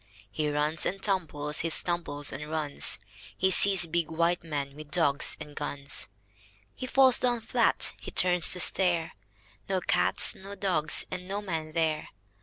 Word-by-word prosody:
He 150 +6 -1
runs 150 +2 0
and 195 - -3
tumbles, 155 -7 -1
he 165 - +1
tumbles 160 -4 -2
and 150 +2 -6
runs. 155 -2 -1 0.4
He 190 0 +3
sees 190 -2 +4
big 170 -1 -1
white 170 +2 +1
men 140 -4 -4
with 155 -1 -10
dogs 140 -1 +2
and 145 -1 -9
guns. 140 -1 -4 0.7
He 255 - -6
falls 265 -1 +5
down 240 -2 +1
flat. - - +1
H)e - - -6
turns 180 -2 +2
to 180 - -1
stare 175 -2 +2 0.3
— 100 - -30
No 190 -1 +2
cats, 90 - +1
no 200 +1 -9
dogs, 165 -7 +1
and 185 0 -5
no 200 +1 -2
men 165 -6 -4
there. 160 -2 0
165 Hz, 165 wpm, -29 LUFS, 150-185 Hz, 0.7 s, falls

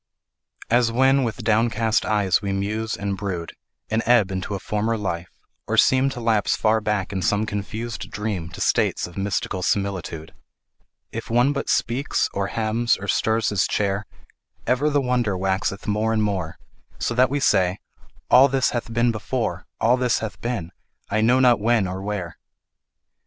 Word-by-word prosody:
As 120 -1 +3
when 135 +3 +3
with 115 0 -3
downcast 110 0 +2
eyes 105 -4 +2
we 100 -2 -2
muse 105 +3 -2
and 100 -1 -2
brood, 95 -4 -4 0.3
And 110 +1 0
ebb 115 -5 +4
into 95 +2 -3
a - - -4
former 110 +3 -1
life, 90 -4 -3 0.4
or - - -1
seem 130 +1 +4
To 135 - -6
lapse 115 -3 +1
far 110 0 +2
back 105 -2 -1
in 95 - -2
some 105 +3 +1
confused 110 +2 -5
dream 100 -5 -4
To - - -9
states - - +1
of 90 - -11
mystical 95 -1 -2
similitude; 90 -5 -2 0.8
If - - -6
one 120 +5 +3
but 140 - -3
speaks 125 +4 0
or 100 0 -1
hems 115 +2 0
or 100 - -7
stirs 110 +2 +1
his 95 -3 +1
chair, 100 0 -1 0.6
Ever 130 +4 +2
the 145 -1 +2
wonder 125 -6 0
waxeth 95 +1 -1
more 105 +2 0
and 110 -1 +1
more, 95 -6 -2 0.4
So - - -1
that 125 +2 +4
we 145 +2 -1
say, 95 -7 +2 0.5
"All 130 +2 +8
this 135 -1 +1
hath 120 -1 -4
been 120 +1 +2
before, 110 -2 -3
All 120 +3 +3
this 125 -2 +1
hath 110 -2 -6
been, 115 -9 -3 0.4
I 110 +1 +2
know 120 +4 +4
not 125 -4 +5
when 110 -2 +2
or 95 +1 -5
where". 95 -4 -4
110 Hz, 170 wpm, -23 LUFS, 100-120 Hz, 0.8 s, All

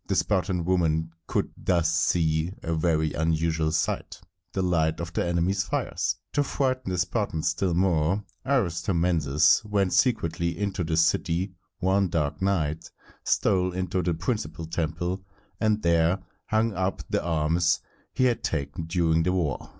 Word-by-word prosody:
The - - 0
Spartan 90 -3 +1
women 80 -3 +1 0.2
could - - -1
thus 85 -3 +1
see 80 0 +1
a 85 - -1
very 80 -1 +1
unusual 80 0 0
sight, 80 - -2 0.3
the 95 - -1
light 80 -3 +1
of 85 0 -5
the - - 0
enemies' 85 +3 +1
fires. 90 - -1 0.2
To 145 - +3
frighten 130 -4 -1
the 90 - -1
Spartans 90 -3 0
still 85 +1 0
more, 90 +1 +2 0.2
Aristomenes 85 - +2
went 100 -4 0
secretly 85 -6 +1
into 100 -3 -2
the 80 -1 -1
city 90 +3 +1 0.2
one 95 +1 +2
dark 80 +1 -1
night, 80 -6 0 0.3
stole 90 -3 +2
into 95 0 -1
the 85 -1 0
principal 80 -3 -3
temple, 85 +3 -2 0.4
and 110 -1 +1
there 85 +1 +3 0.3
hung 110 0 +1
up 95 0 -2
the - - -1
arms 85 +1 +2 0.3
he - - 0
had 125 -2 +2
taken 75 +1 -2
during 80 -2 +2
the 90 +3 +1
war. 85 -7 -1
85 Hz, 145 wpm, -26 LUFS, 80-95 Hz, 0.4 s, To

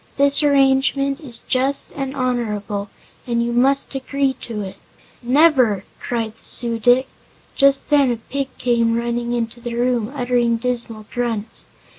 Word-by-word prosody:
This 280 +1 +5
arrangement 275 -1 +2
is 245 -7 -5
just 265 +2 0
and 270 0 -5
honorable, 210 -6 -2 0.4
and 235 -1 0
you 235 0 -2
must 275 +4 +2
agree 270 0 -1
to 220 -3 -5
it." 190 0 -8 0.4
"Never!" 255 - +3 0.2
cried 230 -2 -3
the - - -18
Su 235 -2 +1
dic. 245 +3 +4 0.5
Just 275 +1 +3
then 285 -3 +4
a 235 - -2
pig 275 +4 -4
came 235 -2 +1
running 235 0 -2
into 235 0 -3
the 235 0 -5
room, 240 -1 0
uttering 245 -3 +1
dismal 230 -2 -3
grunts. 230 -3 -2
245 Hz, 145 wpm, -20 LUFS, 230-270 Hz, 0.5 s, This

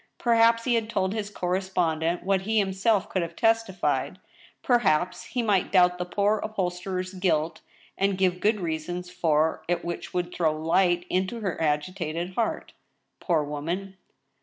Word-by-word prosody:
Perhaps 230 -1 +4
he 245 - +1
had 225 -1 0
told 190 -4 0
his 215 -2 -3
correspondent 180 -3 -1
what 195 0 +1
he 220 +3 -1
himself 195 0 +2
could 185 - -1
have 170 0 -5
testified; 225 -5 +1 0.5
perhaps 180 -8 +2
he 245 +1 -2
might 200 -5 +1
doubt 180 -2 +4
the 180 - -1
poor 205 +3 +1
upholsterer's 185 -2 -3
guilt, 165 -4 0 0.4
and 195 -1 +1
give 185 -1 +1
good 215 +2 +2
reasons 175 +1 -4
for 160 -2 +1
it 175 0 -1
which 170 0 -5
would 180 -1 -2
throw 160 -3 +1
light 175 +2 +2
into 190 +6 -1
her 190 -6 -3
agitated 165 +3 -2
heart— 230 +3 -2 0.5
poor 165 -5 +1
woman 170 +7 -4
185 Hz, 150 wpm, -26 LUFS, 170-200 Hz, 0.5 s, Perhaps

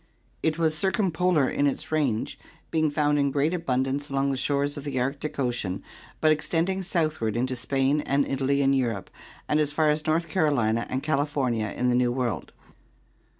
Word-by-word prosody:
It 160 -1 0
was 160 -2 +1
circumpolar 180 -4 +1
in 145 - +1
its 155 +3 -3
range, 140 -8 0 0.3
being 155 -1 +2
found 145 0 +1
in 140 0 +2
great 145 +4 +1
abundance 140 -3 -1
along 140 0 +1
the - - -1
shores 140 +2 0
of 145 - -7
the 140 -3 -2
Arctic 140 +4 -3
Ocean 120 -8 -2 0.4
but 155 - +4
extending 170 +5 0
southward 155 - -1
into 130 +2 0
Spain 135 +4 +1
and 140 +1 +2
Italy 140 +1 +1
in 135 0 +3
Europe 120 -7 -1 0.4
and 150 - +2
as 150 -1 +1
far 155 +1 +2
as 150 +1 -2
North 165 +2 +1
Carolina 120 - +1
and 130 +1 -2
Cali 145 -1 +1
fornia 120 -7 -1
in 125 - +1
the - - +3
New 125 0 +2
World. 120 -4 -2
140 Hz, 180 wpm, -26 LUFS, 130-155 Hz, 0.4 s, but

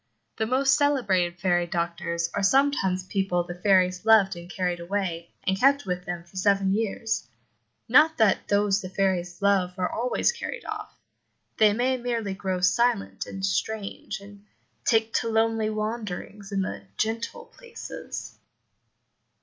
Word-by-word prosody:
The 220 - 0
most 270 +3 +3
celebrated 195 -12 +1
fairy 175 -2 +1
doctors 170 0 -2
are 205 - -1
sometimes 195 -6 +2
people 190 -3 0
the 175 0 -7
fairies 185 0 +2
loved 220 -4 +5
and 170 0 -10
carried 180 -2 -2
away, 170 -2 -3
and 190 0 0
kept 280 +3 +4
with 180 -1 -3
them 175 -1 -4
for 175 +2 -15
seven 195 0 +2
years; 225 +1 -1 0.6
not 320 0 +5
that 220 -4 +3
those 205 0 +2
the 185 - -6
fairies' 185 -2 -1
love 190 -2 +2
are 180 -1 -1
always 245 - +1
carried 485 +1 -6
off 425 -1 -6 0.6
they 215 -1 +6
may 250 +4 +1
merely 235 -5 -2
grow 190 -1 -3
silent 225 +3 +1
and 195 0 -4
strange, 210 0 -3
and 200 0 -14 0.4
take 225 -1 +2
to 230 - -3
lonely 225 -1 +1
wanderings 215 -2 -5
in 195 -1 0
the 185 - -5 0.2
"gentle" 225 +1 -2
places. 470 -2 -8
200 Hz, 145 wpm, -26 LUFS, 180-225 Hz, 0.6 s, they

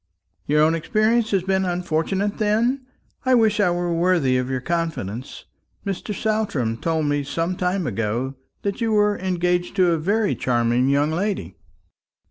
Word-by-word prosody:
"Your 150 +1 +4
own 160 +1 +4
experience 215 +6 +1
has 195 -3 +1
been 190 0 +1
unfortunate, 180 +3 -1
then? 235 +5 +1 0.4
I 260 -1 +4
wish 220 -3 +3
I 200 -3 +4
were 175 0 -1
worthy 165 -6 +2
of 125 0 0
your 130 -1 -1
confidence. 135 - -4 0.4
Mr. 195 +2 -3
Saltram 205 - -1
told 160 +3 -1
me 145 0 0
some 165 +6 -2
time 180 0 -1
ago 115 +3 -2 0.3
that 200 +3 -2
you 225 -1 +1
were 210 -1 +3
engaged 180 -1 0
to 185 -3 +4
a 165 - +1
very 205 +6 +1
charming 120 +1 +1
young 145 +2 +2
lady." 165 - -2
175 Hz, 155 wpm, -22 LUFS, 145-205 Hz, 0.4 s, Your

